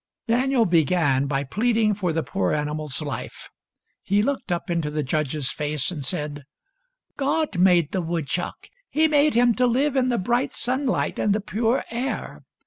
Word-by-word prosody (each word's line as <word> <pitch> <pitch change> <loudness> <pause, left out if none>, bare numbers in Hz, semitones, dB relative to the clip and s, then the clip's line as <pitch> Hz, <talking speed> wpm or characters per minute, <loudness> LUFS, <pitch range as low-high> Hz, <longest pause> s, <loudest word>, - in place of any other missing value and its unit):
Daniel 245 +1 +2
began 160 -5 +2
by 135 0 -1
pleading 220 - +1
for 190 -4 -1
the 160 0 -1
poor 95 -7 -1
animal's 150 -2 -2
life. - - -6 0.5
He 205 +1 +1
looked 275 -6 -2
up 175 +2 -2
into 165 -3 0
the 150 0 -2
judge's 145 0 -1
face, 150 +1 -2
and 150 -5 -5
said: 145 +2 -3 0.3
— - - -49
" - - -66
God 290 - 0
made 175 -4 +4
the 190 - -1
woodchuck. 165 0 -3 0.2
He 315 +1 +3
made 300 -2 +3
him 240 0 +5
to 250 +2 +2
live 270 +4 +1
in 255 -1 +2
the 240 - +1
bright 240 +6 0
sunlight 260 +2 -1
and 205 -1 +2
the - - 0
pure 225 +4 0
air. 245 +4 -4
190 Hz, 175 wpm, -24 LUFS, 150-250 Hz, 0.5 s, him